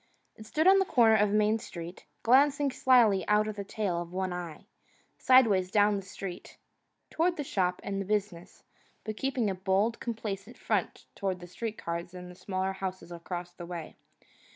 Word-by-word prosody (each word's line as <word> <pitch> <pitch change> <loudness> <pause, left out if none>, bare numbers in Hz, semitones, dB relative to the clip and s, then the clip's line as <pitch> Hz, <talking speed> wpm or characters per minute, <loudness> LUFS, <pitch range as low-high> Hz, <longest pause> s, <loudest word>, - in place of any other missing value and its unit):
It 220 -1 -12
stood 310 +7 0
on 390 0 +7
a - - +1
corner 230 -9 +4
of 210 -1 +3
Main 215 +2 +2
Street, 175 -5 -9 0.2
glancing 280 +3 +4
slyly 235 -8 +4
out 210 +1 +3
of 215 - -4
the 200 - -5
tail 195 -4 -2
of 170 0 -8
one 185 0 -2
eye, 175 0 -7 0.5
side 255 0 +6
ways 190 -4 +1
down 205 +1 +3
the - - -4
street, 190 -1 -8 0.5
toward 345 +2 +1
the 295 - -2
shop 180 -8 -1
and 195 0 -3
the - - -4
business, 200 -4 -3 0.4
but 215 -1 -5
keeping 260 -2 -1
a 195 - 0
bold, 195 +4 0
complacent 220 -1 -5
front - - -2
toward 190 -3 -3
the 175 - -9
street 215 +5 -6
cars 170 +1 -5
and 180 0 -9
the - - -13
smaller 190 +1 -3
houses 185 -2 -6
across 175 +1 -6
the 175 -1 -9
way. 170 -2 -7
200 Hz, 185 wpm, -29 LUFS, 180-225 Hz, 0.5 s, on